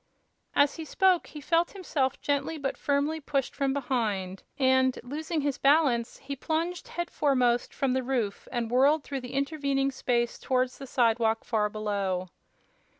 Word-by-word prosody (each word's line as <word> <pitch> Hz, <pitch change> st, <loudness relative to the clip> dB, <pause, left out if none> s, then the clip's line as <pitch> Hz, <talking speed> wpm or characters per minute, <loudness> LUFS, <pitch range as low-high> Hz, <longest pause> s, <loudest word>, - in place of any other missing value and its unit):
As 285 Hz, 0 st, +3 dB
he 325 Hz, -, -5 dB
spoke 370 Hz, +2 st, +2 dB
he 300 Hz, -, -9 dB
felt 335 Hz, +4 st, +1 dB
himself 290 Hz, -9 st, -1 dB
gently 285 Hz, +2 st, -1 dB
but 280 Hz, -2 st, -2 dB
firmly 290 Hz, +2 st, 0 dB
pushed 280 Hz, -3 st, -2 dB
from 275 Hz, -1 st, 0 dB
behind 220 Hz, -9 st, -2 dB, 0.2 s
and, 260 Hz, -1 st, +3 dB
losing 310 Hz, +5 st, -3 dB
his 285 Hz, -2 st, -1 dB
balance, 275 Hz, -5 st, +3 dB
he 280 Hz, +1 st, -6 dB
plunged 325 Hz, +5 st, -2 dB
headforemost 265 Hz, -8 st, +1 dB
from 270 Hz, -2 st, 0 dB
the 260 Hz, -, +1 dB
roof 245 Hz, -6 st, -2 dB
and 235 Hz, -2 st, -2 dB
whirled 280 Hz, +4 st, +4 dB
through 275 Hz, -2 st, -4 dB
the 250 Hz, +1 st, -8 dB
intervening 275 Hz, -1 st, 0 dB
space 240 Hz, -2 st, -1 dB
toward 255 Hz, -1 st, +1 dB
the 270 Hz, +2 st, -11 dB
sidewalk 225 Hz, -2 st, +2 dB
far 210 Hz, -2 st, 0 dB
below. 200 Hz, -4 st, -2 dB
270 Hz, 150 wpm, -28 LUFS, 240-290 Hz, 0.2 s, whirled